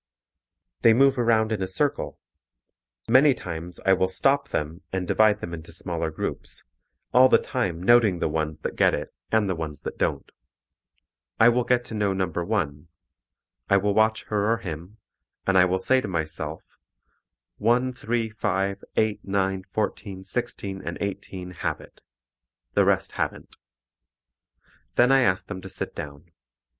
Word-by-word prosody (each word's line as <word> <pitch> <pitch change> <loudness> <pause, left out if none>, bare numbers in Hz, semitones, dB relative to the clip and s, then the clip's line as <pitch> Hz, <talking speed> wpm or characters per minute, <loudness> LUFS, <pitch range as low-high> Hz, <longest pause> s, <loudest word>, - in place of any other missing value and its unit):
They 115 - +7
move 135 +1 +4
around 115 -2 +3
in 105 -3 -1
a 95 - -1
circle. 95 - -1 0.9
Many 130 +3 +6
times 85 -2 -6
I 95 - +6
will 95 0 +2
stop 140 +9 +1
them 80 +4 -3
and 95 -1 -2
divide 105 +1 +3
them 85 - -5
into 80 -1 -8
smaller - - -2
groups, - - -5 0.5
all 130 +1 +7
the - - +7
time 90 -9 -2
noting 110 -3 +5
the - - 0
ones 75 0 -2
that - - -4
get - - +4
it - - -6 0.2
and 110 -2 +3
the 95 - 0
ones 80 -3 -5
that - - -7
don't. - - -1 1.1
I 115 - +8
will 120 +1 +2
get 120 0 +1
to - - -8
know 105 -2 +1
number 90 -3 -1
1. 85 -7 -2 0.8
I 100 - +5
will 100 +1 +1
watch 110 +1 +2
her 105 +1 +1
or 115 - +2
him, 90 0 -7 0.5
and 95 - +2
I 90 -1 +7
will 90 +1 +1
say 130 +7 +3
to - - -4
myself, 80 -3 -3 1.0
1, 125 +4 +2
3, 115 -2 -2
5, 100 -2 -1
8, 110 -1 +1
9, 95 -1 -1
14, 100 -3 -3
16 100 -2 -3
and 85 - -4
18 95 -2 -5
have 90 - -3
it; - - -16 0.7
the - - +4
rest - - +1
haven't. - - -4 1.4
Then 125 +2 +5
I 135 0 +6
ask 90 -6 +1
them 95 -2 -7
to 95 - -9
sit - - -5
down. 75 +3 -9
100 Hz, 160 wpm, -25 LUFS, 90-115 Hz, 1.4 s, I